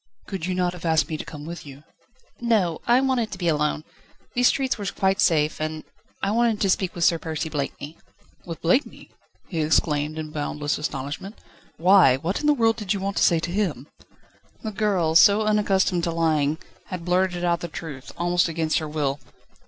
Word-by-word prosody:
"Could 190 -4 -5
you 185 - -1
not 180 -1 0
have 180 - -11
asked 160 -3 +2
me 155 - -3
to - - -5
come 150 -1 -9
with 170 +2 -7
you?" 140 0 -12 0.6
"No; 210 -9 +1
I 240 +1 +5
wanted 255 -4 0
to 195 - -6
be 175 -2 -2
alone. 150 -1 0 0.5
The 245 - 0
streets 260 +1 +2
were 205 - -4
quite 190 0 0
safe, 155 -2 +2
and 155 0 -3 0.4
I 195 - +1
wanted 230 -1 +2
to 195 - +2
speak 190 -1 -1
with 170 - -2
Sir 170 -1 +4
Percy 160 0 -4
Blakeney." 150 +1 -5 0.5
"With 165 -2 -8
Blakeney?" 180 - 0 0.4
he 165 -4 -2
exclaimed 150 0 +1
in 155 -1 -5
boundless 145 -1 -2
astonishment. 150 - -5 0.4
"Why, 180 -7 +6
what 165 +8 -2
in 300 - 0
the 295 - +5
world 225 -3 +2
did 210 -2 -1
you - - -3
want 195 +1 -3
to - - +3
say 170 -2 +4
him?" 175 - -2 0.7
The 220 - -3
girl, 195 -6 +1
so 205 +5 +6
unaccustomed 195 -4 +2
to 170 - -1
lying, 160 -2 +1 0.3
had 180 -2 -6
blurted 180 0 +1
out 170 -1 +1
the 170 - -5
truth, 145 -5 -8
almost 175 +1 +2
against 160 0 0
her 155 -1 -5
will. 145 -2 -1
170 Hz, 190 wpm, -24 LUFS, 155-195 Hz, 0.7 s, Why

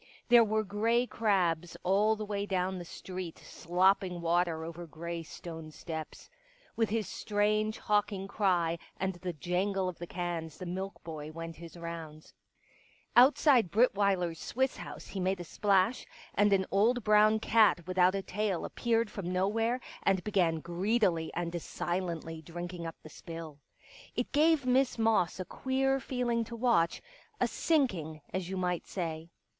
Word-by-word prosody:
There 240 -1 +8
were 215 0 +1
grey 225 +4 +1
crabs 175 -8 0
all 205 +4 +3
the 215 0 -5
way 205 -1 -3
down 185 -1 -1
the 175 - -7
street 180 -1 -7
slopping 180 +1 +1
water 170 -1 +1
over 170 +1 -7
grey 170 +2 -5
stone 165 -1 -8
steps. 160 0 -7 0.5
With 225 -2 +1
his 220 -1 -1
strange, 215 +1 0
hawking 205 -2 0
cry 175 -5 +1 0.2
and 190 +1 -1
the 180 -1 -2
jangle 185 +4 -1
of 180 - -5
the 175 - -6
cans 170 -3 -4
the 185 - -7
milk 190 +3 -5
boy 155 -2 -6
went 165 0 -7
his 170 +1 -10
rounds. 165 -2 -8 0.8
Outside 255 - +6
Brittweiler's 200 -6 +2
Swiss 265 +1 -1
House - - -8
he 195 - -6
made 190 0 0
a - - -4
splash, 195 +5 +1 0.3
and 205 0 +3
an 190 -1 +3
old 230 +5 +3
brown 215 +1 +5
cat 215 -6 +4
without 185 +1 +3
a 195 - -2
tail 200 -2 -1
appeared 230 -2 0
from 180 -3 -4
nowhere, 225 +6 +1 0.2
and 190 -2 +2
began 175 -6 +1
greedily 175 -1 +1
and 170 0 -2
silently 170 -3 -3
drinking 175 +1 -6
up 165 - -7
the 155 - -10
spill. 165 -2 -9 0.6
It 245 - -2
gave 305 -1 +4
Miss 255 0 +2
Moss 220 -7 +2
a 185 - -3
queer 270 +5 0
feeling 240 -2 -1
to 235 - -7
watch 230 -8 +2 0.2
— - - -31
a - - +3
sinking 185 - 0
— - - -28
as 185 -1 -2
you 190 - -3
might 180 -2 -1
say. 165 -3 -4
190 Hz, 160 wpm, -31 LUFS, 170-215 Hz, 0.8 s, There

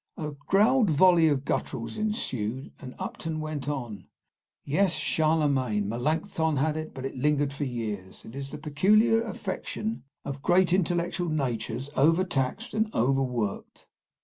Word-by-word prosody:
A 155 -2 -4
growled 200 - +3
volley 165 +1 +5
of 140 -2 +1
gutturals 115 -4 -2
ensued, 135 - -3
and 125 -2 -9
Upton 160 -1 -4
went 155 -2 -4
on: 120 -9 -5 0.6
"Yes, 175 +5 +2
Charlemagne, 140 -11 +1
Melancthon 155 - 0
had 150 +3 +1
it, 155 0 -5
but 130 -1 -5
lingered 145 +1 +1
for 145 +1 -3
years. 110 -7 -5
It 115 - -10
is 140 0 -5
the - - -7
peculiar 200 +10 +3
affection 220 +1 -4 0.2
of 140 -1 -5
great 180 +2 +3
intellectual 175 -1 0
natures 125 -3 -2
over 165 +6 +4
taxed 180 - -2
and 220 0 +1
over 135 +3 +2
worked." 120 -6 -3
150 Hz, 140 wpm, -27 LUFS, 130-175 Hz, 0.6 s, volley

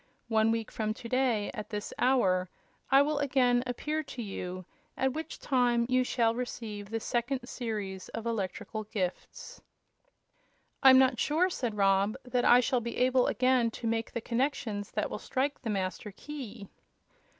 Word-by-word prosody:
One 220 -1 +3
week 225 -1 -1
from 215 -1 -2
to 235 - -8
day, 245 -4 +1
at 210 0 -6
this 210 -1 -5
hour, 185 -9 +3 0.4
I 270 +1 +6
will 295 0 0
again 255 -3 +3
appear 300 +5 -2
to 265 -4 -7
you, 185 -2 -6 0.3
at 265 -1 +1
which 315 +2 -5
time 245 -3 +2
you 255 0 +3
shall 230 -2 +1
receive 220 -4 -5
the 225 +1 -2
second 245 +3 -2
series 210 -7 -4
of 225 0 -6
electrical 215 0 -3
gifts." 190 -4 -5 1.2
"I'm 265 -1 +9
not 260 -2 +4
sure," 345 +5 +2
said 235 -9 -3
Rob, 195 +2 +3
"that 250 -1 0
I 245 +1 +7
shall 250 0 +1
be 235 0 -5
able 255 0 +3
again 255 -2 +3
to 240 - -7
make 225 0 -1
the 235 - -3
connections 230 -5 -2
that - - -2
will - - -4
strike 280 +2 -2
the 230 - -4
Master 195 0 -3
Key." 230 -3 -8
235 Hz, 160 wpm, -30 LUFS, 210-255 Hz, 1.2 s, I'm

